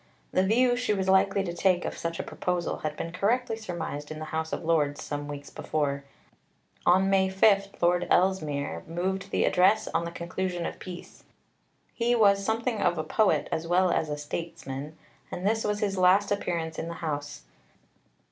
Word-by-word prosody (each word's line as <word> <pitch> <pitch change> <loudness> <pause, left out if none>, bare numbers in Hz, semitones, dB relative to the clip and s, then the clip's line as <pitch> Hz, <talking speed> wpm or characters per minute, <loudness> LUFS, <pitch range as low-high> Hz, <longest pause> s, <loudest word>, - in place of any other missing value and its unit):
The 185 - +3
view 245 +6 +3
she 245 -4 0
was 190 -1 -2
likely 195 +1 +3
to 175 -3 -4
take 180 0 +2
of - - -3
such 165 0 -4
a - - -1
proposal 180 -1 -2
had 155 -1 -4
been 165 - -4
correctly 225 +6 0
surmised 170 -8 -5
in 155 - -6
the 155 - -5
House 160 0 -2
of - - -3
Lords 150 -3 +1
some 145 0 -4
weeks 145 -1 -7
before. 140 -2 -2 0.8
On 185 +2 +5
May 190 -1 +3
5 195 +1 +4 0.2
Lord 175 +1 +3
Ellesmere 155 -6 +1
moved 190 +4 -2
the - - +1
Address 195 +4 +3
on 165 - 0
the - - -3
conclusion 175 +1 -3
of - - -5
peace. 180 -2 -10 0.7
He 240 +1 +1
was 200 -3 +4
something 225 +1 -1
of 175 -1 +2
a 155 - -1
poet, 215 +3 +2
as 160 +1 -2
well 180 +1 +3
as 160 -2 0
a 150 - -2
statesman, 150 -1 -6 0.3
and 180 - -5
this 220 +2 +1
was 210 0 -1
his 195 -2 0
last 190 +3 +4
appearance 170 -5 -2
in - - -3
the 170 - -5
House. 145 - -4
180 Hz, 185 wpm, -27 LUFS, 160-195 Hz, 0.8 s, On